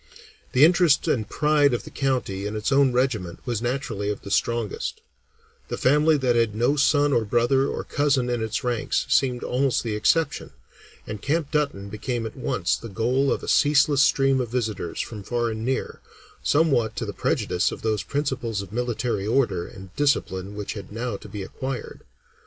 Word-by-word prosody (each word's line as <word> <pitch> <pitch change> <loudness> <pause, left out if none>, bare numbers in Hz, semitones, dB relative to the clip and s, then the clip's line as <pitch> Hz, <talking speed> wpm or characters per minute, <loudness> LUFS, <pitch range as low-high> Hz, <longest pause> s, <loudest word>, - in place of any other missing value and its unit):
The 130 +4 +7
interest 175 -3 +4
and 110 -5 0
pride 150 -3 +3
of - - -4
the - - -11
county 125 -8 -1
in 105 - -5
its 105 +4 -2
own 135 -1 +4
regiment 120 -9 -1
was 120 -3 -2
naturally 120 -5 -2
of 105 - -4
the 100 - -8
strongest; 115 0 -1 0.7
the - - -4
family 150 +4 +4
that 130 -3 +1
had 115 -3 +1
no 120 +6 +2
son 145 0 +3
or 115 - +3
brother 120 +5 +2
or - - -3
cousin 140 -3 +1
in 120 -2 -1
its 110 -2 -2
ranks 120 -2 0
seemed 125 -3 +2
almost 130 +1 0
the 110 -3 -2
exception, 145 +8 +1 0.5
and 105 -1 -6
Camp 150 +1 -1
Dutton 145 -10 -1
became 115 +3 -3
at 110 - -6
once - - 0
the 115 - -9
goal 125 +7 +1
of - - -1
a - - -6
ceaseless 145 -1 +4
stream 135 -2 +3
of 120 - -4
visitors 110 -8 -2
from 110 -3 -7
far 120 +3 -1
and 110 0 -5
near, 130 +2 -2 0.4
somewhat 140 -8 +2
to - - -3
the - - -5
prejudice 90 - 0
of - - -8
those 110 -2 0
principles 125 -4 -2
of 100 - -12
military 115 -3 -2
order 105 -8 +1
and 95 -1 -12
discipline 100 -9 0
which 105 -1 -4
had 100 -2 -9
now 115 +1 -3
to - - -10
be 105 -2 -5
acquired. 130 +5 -6
120 Hz, 185 wpm, -24 LUFS, 110-140 Hz, 0.7 s, The